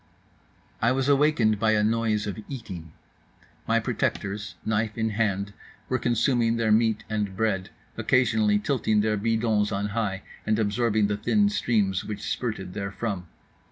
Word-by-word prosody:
I 115 Hz, -, +4 dB
was 135 Hz, 0 st, 0 dB
awakened 140 Hz, -7 st, +3 dB
by 110 Hz, 0 st, +3 dB
a 105 Hz, -1 st, +3 dB
noise 110 Hz, -1 st, +1 dB
of 105 Hz, +1 st, -4 dB
eating. 95 Hz, -, -7 dB, 0.8 s
My -, -, +3 dB
protectors, 100 Hz, 0 st, -2 dB
knife 110 Hz, +1 st, 0 dB
in 110 Hz, -1 st, 0 dB
hand, 100 Hz, -2 st, -1 dB, 0.4 s
were 130 Hz, -, +1 dB
consuming 120 Hz, -1 st, +2 dB
their 110 Hz, -2 st, +1 dB
meat 110 Hz, 0 st, +3 dB
and 105 Hz, -3 st, -2 dB
bread, 100 Hz, -4 st, 0 dB, 0.3 s
occasionally 110 Hz, -5 st, +3 dB
tilting 110 Hz, -2 st, +1 dB
their 105 Hz, 0 st, +1 dB
bidons 110 Hz, -1 st, +1 dB
on 100 Hz, +1 st, -1 dB
high 100 Hz, -2 st, -2 dB, 0.2 s
and 110 Hz, 0 st, +1 dB
absorbing 110 Hz, 0 st, +1 dB
the 100 Hz, 0 st, 0 dB
thin 205 Hz, -, +2 dB
streams 105 Hz, -, +1 dB
which 105 Hz, -, -6 dB
spurted 110 Hz, -7 st, -3 dB
therefrom. 100 Hz, -2 st, -4 dB
110 Hz, 145 wpm, -26 LUFS, 105-115 Hz, 0.8 s, I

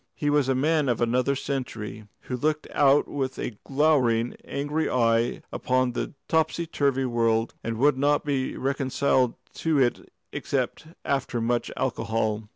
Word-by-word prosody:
He 145 Hz, -1 st, 0 dB
was 145 Hz, -3 st, +2 dB
a 135 Hz, -, +2 dB
man 150 Hz, +1 st, +2 dB
of 120 Hz, -, +1 dB
another 125 Hz, +3 st, +1 dB
century, 115 Hz, -6 st, -4 dB
who 125 Hz, -, -4 dB
looked 150 Hz, +4 st, -1 dB
out 140 Hz, 0 st, +4 dB
with 135 Hz, -2 st, -3 dB
a 110 Hz, -4 st, -5 dB
glowering, 135 Hz, -5 st, +2 dB
angry 145 Hz, +3 st, -2 dB
eye 115 Hz, -1 st, +1 dB
upon 130 Hz, -1 st, 0 dB
a -, -, -2 dB, 0.2 s
topsy 160 Hz, +1 st, +1 dB
turvy 140 Hz, -4 st, 0 dB
world, 115 Hz, -2 st, +1 dB
and 115 Hz, -1 st, -3 dB
would 140 Hz, +2 st, +3 dB
not 145 Hz, +1 st, +2 dB
be 135 Hz, -3 st, -1 dB
reconciled 135 Hz, -2 st, +1 dB, 0.2 s
to 160 Hz, -2 st, +1 dB
it 125 Hz, -2 st, 0 dB, 0.2 s
except -, -, -2 dB, 0.2 s
after 135 Hz, -3 st, -1 dB
much 120 Hz, +1 st, 0 dB
alcohol. 110 Hz, -3 st, -1 dB
130 Hz, 150 wpm, -26 LUFS, 120-145 Hz, 0.2 s, out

